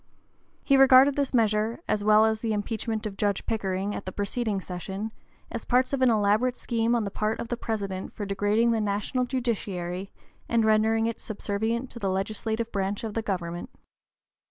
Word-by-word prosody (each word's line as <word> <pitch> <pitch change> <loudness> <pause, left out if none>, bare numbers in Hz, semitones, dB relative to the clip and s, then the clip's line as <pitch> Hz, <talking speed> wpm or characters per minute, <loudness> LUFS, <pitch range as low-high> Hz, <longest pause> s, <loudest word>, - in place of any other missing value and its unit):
He 275 - +4
regarded 270 +1 +7
this 280 -2 0
measure, 220 -1 +1
as 205 - 0
well 215 +1 +6
as 220 0 +1
the 220 -1 -1
impeachment 220 +1 -2
of 200 -2 -5
Judge 205 -2 0
Pickering 200 -2 -1
at 200 - -6
the - - -2
preceding 205 +1 -1
session, 190 +4 -5 0.4
as 235 - -4
parts 255 +2 +2
of 275 - 0
an 255 - +5
elaborate 220 +3 +2
scheme 235 -1 0
on 235 - +1
the 200 - -4
part 215 +2 -1
of 230 - -5
the 240 - 0
President 200 -5 -4
for 205 - -5
degrading 205 +4 +2
the 225 -1 +1
national 210 +5 -1
judiciary 200 -7 -3 0.4
and 230 -1 +3
rendering 220 +1 +3
it 230 0 -3
subservient 220 +4 -2
to 235 - -8
the 195 -3 -1
legislative 220 +4 -2
branch 200 +1 -2
of 220 -2 -4
the 225 - -1
government. 175 -4 -4
215 Hz, 180 wpm, -27 LUFS, 200-235 Hz, 0.4 s, regarded